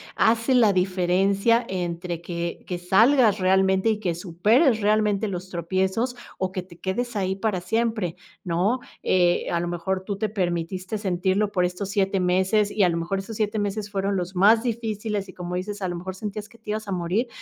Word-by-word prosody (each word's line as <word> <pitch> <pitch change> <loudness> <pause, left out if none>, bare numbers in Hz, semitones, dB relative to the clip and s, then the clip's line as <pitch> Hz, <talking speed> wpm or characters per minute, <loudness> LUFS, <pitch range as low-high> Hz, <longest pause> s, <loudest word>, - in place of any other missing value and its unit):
hace 230 +3 +3
la 220 -5 +5
diferencia 195 +5 +2
entre 175 -2 -3
que 170 0 -4
que 180 - -3
salgas 220 +4 +4
realmente 190 +2 +3
y 215 -1 0
que 175 -5 -1
superes 215 - +2
realmente 210 0 +2
los 185 -1 -5
tropiezos, 190 +8 -1 0.2
o 185 -1 -2
que 185 -1 -4
te 175 -2 -16
quedes 240 +5 -3
ahí 190 -2 0
para 195 -2 -1
siempre, 220 -3 -1 0.3
¿no? 185 +8 +1 0.2
Eh, 175 -1 +2
a 170 - +1
lo 175 - -2
mejor 175 +2 -2
tú 200 -1 -3
te 215 +1 -1
permitiste 185 0 -2
sentirlo 190 +1 0
por 180 -2 +2
estos 180 +2 -4
7 195 -1 +1
meses 190 +3 +2
y 210 - +2
a 180 - +5
lo 170 - -1
mejor 175 +4 -2
esos 205 +3 -7
7 215 0 0
meses 205 0 -2
fueron 200 0 -1
los 185 0 -3
más 215 +5 +5
difíciles 215 -4 -3
y - - -10
como 180 0 -5
dices, 200 +3 -4
a 185 - -1
lo 175 - -3
mejor 185 +2 -6
sentías 210 +1 -6
que 230 - -18
te 220 -2 -7
ibas 215 0 -3
a - - -4
morir, 185 +7 0
195 Hz, 195 wpm, -24 LUFS, 180-215 Hz, 0.3 s, la